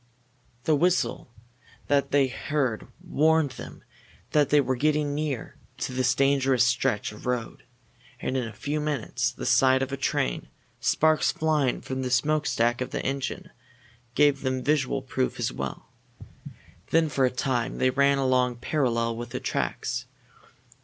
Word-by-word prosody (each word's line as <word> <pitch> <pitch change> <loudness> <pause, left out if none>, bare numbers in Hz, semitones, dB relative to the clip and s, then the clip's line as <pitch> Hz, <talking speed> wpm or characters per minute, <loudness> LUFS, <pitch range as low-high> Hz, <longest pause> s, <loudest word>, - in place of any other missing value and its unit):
The 155 - +2
whistle 175 -5 0 0.6
that 140 -1 +2
they 140 -1 +4
heard 130 -3 -2 0.2
warned 160 -2 +3
them - - -10 0.5
that 145 -3 +3
they 150 - +5
were 130 -2 +1
getting 150 +2 +1
near 145 -4 -3 0.2
to - - -4
this 130 0 +1
dangerous 135 -2 +3
stretch 115 -4 +1
of 105 +3 -10
road, 125 -2 -2 0.6
and 130 - -3
in 125 -3 -1
a - - -7
few 145 +8 -3
moments 150 -6 -1
the - - -7
sight 130 0 +4
of 135 - -5
a 140 - -3
train, 65 - -1 0.3
sparks 155 0 +3
flying 155 -5 0
from 130 0 -4
the 130 - -2
smokestack 125 -3 +1
of 125 - -2
the - - -4
engine, 140 +7 -3 0.6
gave 145 -1 +4
them 130 -1 -2
visual 135 -2 +1
proof 130 0 -2
as - - 0
well. 70 -1 -6 1.0
Then 165 0 +3
for 140 -3 0
a - - +3
time 125 -1 -2
they 130 - +2
ran 140 +1 +3
along 130 -2 +2
parallel 115 -3 0
with 120 +1 -6
the - - -4
tracks. - - -2
135 Hz, 155 wpm, -26 LUFS, 125-145 Hz, 1.0 s, they